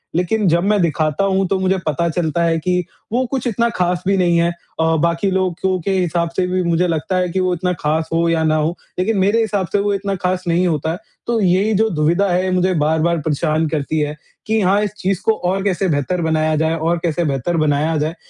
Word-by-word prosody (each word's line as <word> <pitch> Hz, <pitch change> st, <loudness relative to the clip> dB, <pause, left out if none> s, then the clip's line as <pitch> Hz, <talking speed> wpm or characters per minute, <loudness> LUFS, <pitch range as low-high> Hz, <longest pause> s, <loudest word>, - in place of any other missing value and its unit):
लेकिन 190 Hz, +4 st, +1 dB
जब 170 Hz, +1 st, +2 dB
मैं 205 Hz, -1 st, +2 dB
दिखाता 155 Hz, 0 st, 0 dB
हूँ, 195 Hz, -1 st, +1 dB
तो 190 Hz, +1 st, 0 dB
मुझे 190 Hz, 0 st, +1 dB
पता 170 Hz, +3 st, 0 dB
चलता 170 Hz, 0 st, -1 dB
है 165 Hz, -1 st, +2 dB
कि 180 Hz, +2 st, 0 dB, 0.3 s
वो 250 Hz, +3 st, +1 dB
कुछ 260 Hz, -2 st, -1 dB
इतना 235 Hz, +1 st, +1 dB
खास 180 Hz, -4 st, -1 dB
भी 195 Hz, 0 st, +3 dB
नहीं 175 Hz, -2 st, +2 dB
है 170 Hz, +1 st, +2 dB, 0.3 s
अ, 160 Hz, 0 st, +2 dB
बाकी 170 Hz, +3 st, +1 dB
लोगों 185 Hz, 0 st, 0 dB
के 195 Hz, -, -2 dB
हिसाब 170 Hz, -1 st, 0 dB
से 185 Hz, -, +1 dB
भी 185 Hz, 0 st, 0 dB
मुझे 170 Hz, +1 st, +1 dB
लगता 165 Hz, +3 st, -2 dB
है 180 Hz, -1 st, 0 dB
कि 190 Hz, -, -2 dB
वो 185 Hz, -1 st, +1 dB
इतना 180 Hz, +1 st, -1 dB
खास 160 Hz, +1 st, -1 dB
हो 165 Hz, +1 st, +2 dB
या 165 Hz, -1 st, +1 dB
ना 155 Hz, 0 st, +2 dB
हो, 155 Hz, +2 st, 0 dB, 0.2 s
लेकिन 205 Hz, +4 st, +1 dB
मेरे 200 Hz, +4 st, +3 dB
हिसाब 205 Hz, -4 st, -1 dB
से 205 Hz, -, +3 dB
वो 205 Hz, 0 st, 0 dB
इतना 195 Hz, 0 st, -2 dB
खास 185 Hz, 0 st, -2 dB
नहीं 175 Hz, +2 st, +2 dB
होता 160 Hz, -1 st, -1 dB
है। 170 Hz, -, -4 dB, 0.3 s
तो 235 Hz, -1 st, +1 dB
यही 195 Hz, +3 st, +2 dB
जो 220 Hz, +3 st, +2 dB
दुविधा 170 Hz, +3 st, +1 dB
है, 185 Hz, +1 st, +1 dB
मुझे 185 Hz, 0 st, +2 dB
बार-बार 160 Hz, +2 st, +1 dB
परेशान 155 Hz, +1 st, 0 dB
करती 155 Hz, +1 st, -2 dB
है 150 Hz, 0 st, -1 dB, 0.3 s
कि 220 Hz, +1 st, +2 dB
हाँ, 195 Hz, +2 st, +3 dB
इस 210 Hz, -1 st, -3 dB
चीज़ 195 Hz, -1 st, -1 dB
को 225 Hz, -, +5 dB, 0.2 s
और 190 Hz, +1 st, -1 dB
कैसे 195 Hz, -1 st, 0 dB
बेहतर 160 Hz, +4 st, -1 dB
बनाया 155 Hz, -1 st, +1 dB
जाए 160 Hz, +1 st, +1 dB
और 165 Hz, +2 st, 0 dB
कैसे 170 Hz, 0 st, 0 dB
बेहतर 145 Hz, +4 st, -1 dB
बनाया 155 Hz, +1 st, +1 dB
जाए। 155 Hz, +3 st, -2 dB
175 Hz, 235 wpm, -18 LUFS, 160-190 Hz, 0.3 s, को